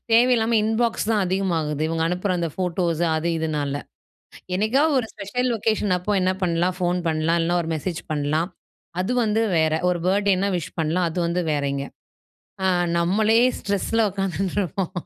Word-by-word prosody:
தேவையில்லாம 230 -1 +4
இன்பாக்ஸ் 225 0 0
தான் 210 -3 +2
அதிகமாகுது. 170 -6 -1
இவங்க 165 0 -1
அனுப்புற 180 +3 -1
அந்த 170 -1 -1
ஃபோட்டோஸ் 175 -2 -1
அது 165 +2 -1
இதுனால. 145 -3 -2 0.7
என்னைக்காவது 265 +10 +2
ஒரு 225 - -6
ஸ்பெஷல் 250 +6 -2
லொக்கேஷன் 215 -3 +1
அப்போ 205 +4 -2
என்ன 185 0 +2
பண்ணலாம், 175 +1 +1
ஃபோன் 180 0 +1
பண்ணலாம், 160 +1 +1
இல்லைனா 175 +1 +1
ஒரு 160 - -5
மெசேஜ் 165 +2 -3
பண்ணலாம், 155 +4 0 0.5
அது 215 +7 -1
வந்து 220 +1 +1
வேற. 160 -1 +3 0.2
ஒரு 175 -1 -1
பர்த்டே 200 +1 +3
என்ன 200 +2 +1
விஷ் 170 0 -6
பண்ணலாம் 170 +3 +1
அது 180 - -5
வந்து 175 +1 0
வேறங்க. 140 -1 -1 0.8
அ - - +3 0.3
நம்மளே 210 +6 +3 0.2
ஸ்ட்ரெஸ்ஸில 210 +2 0
உக்காந்துட்டு 195 0 -2
இருப்போம். 185 0 -2
180 Hz, 155 wpm, -23 LUFS, 165-210 Hz, 0.8 s, தேவையில்லாம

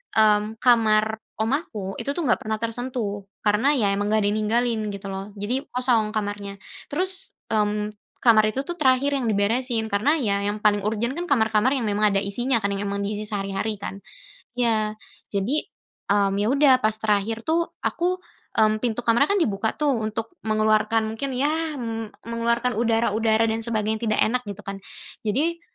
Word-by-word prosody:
mmm, 215 0 +3
kamar 220 -3 +4 0.2
omaku 220 - -2
itu 280 - -1
tuh 340 +4 -3
nggak 240 - +3
pernah 220 0 -2
tersentuh, 230 -3 -3 0.2
karena 210 +7 +3
ya 260 -8 +2
emang 205 +1 -1
nggak 215 - +3
ada 205 - +1
yang 215 - 0
tinggalin 230 +1 +1
gitu 200 0 -7
loh. 195 +1 -6
Jadi 245 +7 -1
kosong 245 -4 +2
kamarnya. 205 -2 -4 0.3
Terus, 370 +5 0 0.2
mmm, 210 0 0 0.3
kamar 220 -3 +6
itu 270 +6 -3
tuh 350 - -3
terakhir 280 -3 +2
yang 260 -5 0
diberesin 225 +3 +1
karena 220 +9 +2
ya 200 -8 0
yang 205 +1 -1
paling 210 -1 +2
urgen 220 +4 -1
kan 345 +3 -5
kamar-kamar 225 -3 +3
yang 245 - -1
memang 210 0 +2
ada 200 - +1
isinya 230 +6 +1
kan, 200 -2 -1
yang 195 - -3
memang 200 0 -2
diisi 210 +1 -3
sehari-hari 200 +1 -2
kan. 200 0 -7 0.6
Iya 220 -3 +1 0.3
jadi, 200 +5 -1 0.6
mmm 200 -1 +3
ya 205 - +1
udah 275 +1 +5
pas 215 -2 +1
terakhir 220 +1 0
tuh 335 +1 +1 0.2
aku 355 +2 0 0.4
mmm, 215 0 +3
pintu 240 0 -2
kamar 235 +5 +3
kan 405 - +2
dibuka 220 - 0
tuh 295 -2 +2
untuk 220 -1 -3
mengeluarkan 215 0 +2
mungkin 260 +3 -3
ya, 285 +4 +2 0.2
mmm, 225 -3 -5
mengeluarkan 235 0 0
udara-udara 225 -1 +2
dan 225 0 0
sebagainya 220 0 -1
tidak 215 - +2
enak 250 +3 0
gitu 205 +1 -7
kan. 195 0 -6 0.4
Jadi, 300 +11 0
220 Hz, 170 wpm, -24 LUFS, 210-245 Hz, 0.6 s, kamar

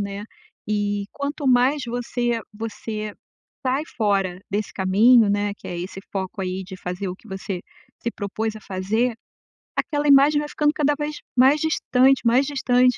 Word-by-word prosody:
né. 200 0 -4 0.4
E 205 -1 0
quanto 285 +1 -3
mais 260 +3 +4
você 240 0 -1
você 215 -1 -5 0.5
sai 260 +3 +1
fora 195 -5 +1
desse 205 +1 -2
caminho, 210 +4 +5
né, 205 0 0
que - - -10
é 175 - -4
esse 185 +2 -6
foco 190 0 -3
aí 185 +1 -3
de 190 +1 -9
fazer 180 +2 -4
o 180 - -4
que 225 - -19
você 190 -1 -4 0.4
se 235 - -1
propôs 220 +1 -3
a - - -10
fazer, 210 +6 -1 0.6
aquela 295 0 0
imagem 285 +1 +6
vai 295 0 -4
ficando 295 0 +2
cada 295 -1 +2
vez 300 0 -3 0.2
mais 270 +4 +6
distante, 270 -4 +3
mais 245 +4 +4
distante, 250 -3 +3
225 Hz, 160 wpm, -23 LUFS, 200-265 Hz, 0.6 s, imagem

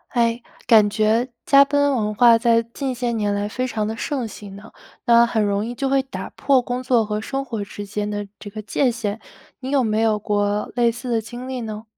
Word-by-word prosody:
诶， 235 0 +1 0.2
感 220 -3 +6
觉 215 +3 +1 0.2
加 280 0 +7
班 285 0 +1
文 210 -2 -1
化 235 +1 +6
在 230 0 +3
近 260 +3 -4
些 240 -1 -2
年 210 -3 -1
来 205 0 -1
非 255 +4 -3
常 215 -3 -2
地 220 - -3
盛 255 0 -3
行 205 -2 -10
呢， 205 +3 -13 0.3
那 235 0 +6
很 230 -2 +1
容 200 0 0
易 240 +2 -5
就 270 +3 -2
会 270 0 +2
打 265 +1 -8
破 275 -2 +2
工 245 +1 -3
作 245 -3 +2
和 210 0 -3
生 270 +4 -4
活 225 -5 -4
之 205 +1 -8
间 210 +1 -3
的 205 -1 -4
这 205 - -8
个 215 +2 -8
界 245 +6 +1
限， 225 -3 -3 0.4
你 260 - -6
有 275 -2 +2
没 215 -1 0
有 220 -1 +2
过 205 0 -1
类 240 -1 +3
似 245 +2 -6
的 230 -1 +1
经 240 +3 -8
历 260 -1 -4
呢？ 215 -1 -6
230 Hz, 245 characters per minute, -21 LUFS, 210-250 Hz, 0.4 s, 加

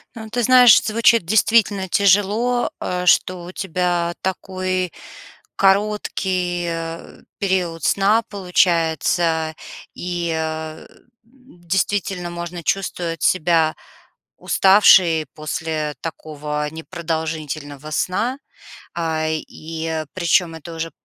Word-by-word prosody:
Ну, 220 -1 -8
ты 245 +1 -1
знаешь, 250 -1 +7
звучит 230 -2 +3
действительно 205 -1 +2
тяжело, 205 +5 +2
э, 180 0 -3
что 180 0 +3
у 175 - -8
тебя 175 -2 -1
такой 185 -1 -2 0.6
короткий, 190 -3 0
э, 165 0 -6 0.2
период 180 -4 -1
сна 210 +4 +3
получается, 165 -4 +1 0.4
и, 175 -1 -3
а, 160 0 -5 0.4
действительно 195 -6 -3
можно 170 0 -6
чувствовать 170 -3 -2
себя 165 -2 +2 0.6
уставшей 185 -5 +5
после 155 -1 -3
такого 150 -1 -5
непродолжительного 155 -2 -5
сна. 185 - -1 0.6
Э, 160 -2 -1
и 160 0 -5
причём 170 -1 +1
это 165 +1 -9
уже 165 0 -4
175 Hz, 90 wpm, -20 LUFS, 160-195 Hz, 0.6 s, знаешь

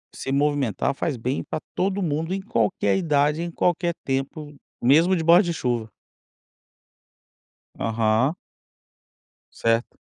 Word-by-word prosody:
Se 135 - -5
movimentar 140 -5 +1
faz 135 0 -2
bem 125 +4 -2
pra - - -4 0.2
todo 195 +2 0
mundo 160 +1 -1
em 195 - -2
qualquer 110 - 0
idade 150 -2 +1
em 170 0 -4
qualquer 175 0 0
tempo 140 +2 -3 0.3
mesmo 160 +9 +4
de 165 - -1
baixo 170 +4 +6
de 170 - -2
chuva. 120 -7 -2 1.9
Aham. 115 +6 +1 1.2
Certo. 115 +1 0
145 Hz, 120 wpm, -24 LUFS, 120-170 Hz, 1.9 s, baixo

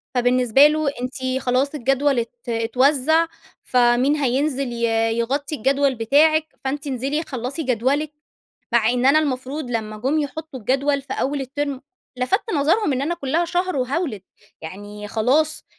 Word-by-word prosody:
فبالنسبة 250 +2 +5
له 305 -1 0
أنتِ 260 0 -3
خلاص 260 +4 0
الجدول 270 0 +1
ات 235 +1 -5
اتوزّع، 260 +7 +2 0.4
فمين 250 +3 +3
هينزل 275 -1 0
ي 235 - -4 0.3
يغطّي 280 +6 -1
الجدول 275 +1 +1
بتاعِك، 300 +7 +3 0.2
فأنتِ 280 +2 -3
انزلي 275 +5 -2
خلّصي 260 +3 -4
جدولِك. 265 +4 0 0.6
مع 235 -1 +3
إن 250 +1 +1
أنا 295 +3 +6
المفروض 265 -1 -3
لمّا 215 -2 -3
جم 270 +8 0
يحطّوا 295 -2 -5
الجدول 275 +5 0
في 270 - -7
أول 280 +1 -1
الترم، 275 0 -3 0.4
لفَتت 390 - 0
نظرهم 310 +4 +2
إن 260 - -1
أنا 325 +5 -1
كُلّها 330 +1 -1
شهر 355 0 -1
وهاولد. 260 - -2 0.4
يعني 205 +5 -8
خلاص 280 +9 +1
270 Hz, 140 wpm, -21 LUFS, 245-295 Hz, 0.6 s, أنا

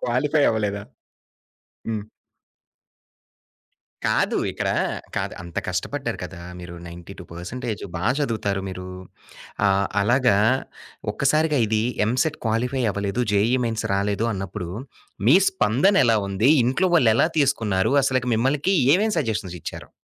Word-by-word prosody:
Qualify 145 +5 +1
అవ్వలేదా? 105 -2 -2 1.1
హ్మ్. 110 -2 -2 2.0
కాదు, - - +1
ఇక్కడ - - -3 0.5
కాదు. - - -2
అంత 85 -1 -12
కష్టపడ్డారు - - -3
కదా! 85 - -9 0.2
మీరు 85 0 -9
92% 85 +2 -10
పర్సంటేజ్ 110 +6 -5
బా 85 - -4 0.2
చదువుతారు 110 -8 -1
మీరు. 90 0 -7 0.8
ఆహ్, 100 0 +2
అలాగా 120 +1 +3 0.8
ఒక్కసారిగా 150 +3 +2
ఇది 110 0 +1 0.2
ఎంసెట్ 130 +7 0
క్వాలిఫై 125 +4 0
అవ్వలేదు, 100 +4 -2
జేఈఈ 115 +6 +3
మెయిన్స్ 115 -1 -3
రాలేదు 100 +3 0
అన్నప్పుడు 95 -2 -5 0.6
మీ 150 - +8
స్పందన 185 - +2
ఎలా 115 -2 +4
ఉంది? 100 +6 +2 0.2
ఇంట్లో 130 +10 +1
వాళ్లు 120 -8 +5
ఎలా 135 - +3
తీసుకున్నారు? 115 -8 +1
అసలకి 130 -2 0
మీకు 140 - +1 0.2
ఏమేం 215 +4 +2
సజెషన్స్ 105 - -2
ఇచ్చారు? - - -8
115 Hz, 115 wpm, -23 LUFS, 100-130 Hz, 2.0 s, మీ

